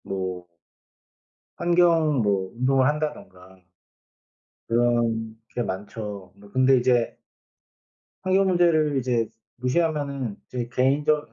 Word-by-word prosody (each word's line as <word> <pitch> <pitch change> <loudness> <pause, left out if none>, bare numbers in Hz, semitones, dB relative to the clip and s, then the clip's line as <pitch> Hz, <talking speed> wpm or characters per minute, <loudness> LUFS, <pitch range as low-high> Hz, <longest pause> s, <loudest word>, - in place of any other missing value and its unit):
뭐 95 -2 -4 1.1
환경 170 -5 +3
뭐 100 -3 0
운동을 130 +2 +2
한다든가 95 -12 -4 1.1
그런 115 -1 +1
게 120 - -3
많죠. 100 0 -6
뭐 100 0 -17
근데 130 +2 +4
이제 120 -1 +2 1.1
환경 190 +1 +3
문제를 165 -5 +3
이제 120 -3 0 0.3
무시하면은 140 -3 -1
이제 120 -2 -4
개인적 145 +4 +1
125 Hz, 200 characters per minute, -24 LUFS, 105-150 Hz, 1.1 s, 근데